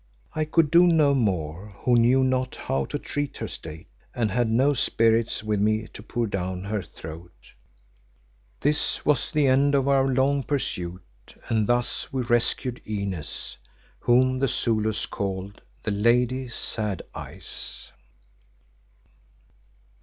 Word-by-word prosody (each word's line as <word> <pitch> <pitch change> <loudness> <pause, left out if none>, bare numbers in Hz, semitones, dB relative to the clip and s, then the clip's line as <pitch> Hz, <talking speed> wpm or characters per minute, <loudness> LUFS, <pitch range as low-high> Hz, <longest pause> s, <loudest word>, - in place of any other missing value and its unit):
I 155 - 0
could 155 -1 +2
do 175 +1 +7
no 155 -4 +4
more 95 - -1
who 125 - +4
knew 120 +3 +5
not 130 0 0
how 70 0 -1
to - - -3
treat 145 -1 -4
her - - -4
state, 80 0 -9 0.3
and 110 -4 0
had 120 +2 +1
no 130 +6 +3
spirits 115 -3 +2
with 105 -1 0
me 110 +2 +1
to - - -10
pour 120 +2 -2
down 95 -3 -3
her 105 0 -2
throat. 85 +1 -11 1.1
This 145 +1 +1
was 150 -1 +2
the 150 -2 +2
end 140 +2 +4
of 135 -1 +2
our 135 -1 +4
long 135 +2 +2
pursuit, 90 -11 -2 0.5
and 110 -3 +1
thus 120 0 0
we 130 -2 -1
rescued 120 +1 0
Inez, 100 -7 -4 0.4
whom 130 +1 +3
the 135 - +2
Zulus 110 -3 +1
called 100 0 -4 0.2
the 110 - -1
Lady 125 +5 +2
Sad 110 -4 -3
Eyes. - - -8
120 Hz, 135 wpm, -25 LUFS, 100-130 Hz, 1.1 s, do